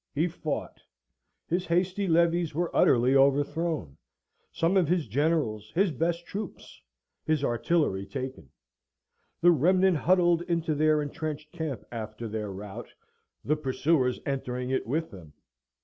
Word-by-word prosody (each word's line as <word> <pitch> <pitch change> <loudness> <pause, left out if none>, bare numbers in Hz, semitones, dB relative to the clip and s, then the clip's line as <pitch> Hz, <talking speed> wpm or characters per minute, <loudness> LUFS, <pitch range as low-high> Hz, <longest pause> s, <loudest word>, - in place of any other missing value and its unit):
He 160 +5 +2
fought: 160 -3 -5 0.6
his 180 +2 -1
hasty 185 +3 0
levies 170 -1 +2
were 170 +1 -2
utterly 125 +2 +4
overthrown; 140 - +1 0.5
some 165 +4 +1
of 185 -4 +4
his 170 -3 +1
generals, 115 -5 0
his 190 0 +3
best 170 +4 -1
troops, 210 +4 -7 0.4
his 155 -3 0
artillery 120 - 0
taken; 130 - -6 0.9
the 175 +1 +7
remnant 180 +3 +3
huddled 175 +1 +3
into 165 -2 0
their 155 0 +2
entrenched 150 +1 -5
camp 160 -7 -4
after 110 0 -6
their 105 -1 -4
rout, 95 +1 -8 0.5
the 150 - +2
pursuers 135 -2 +1
entering 125 -2 -3
it 130 - -1
with 160 +6 -2
them. 85 -6 -12
150 Hz, 130 wpm, -28 LUFS, 125-170 Hz, 0.9 s, the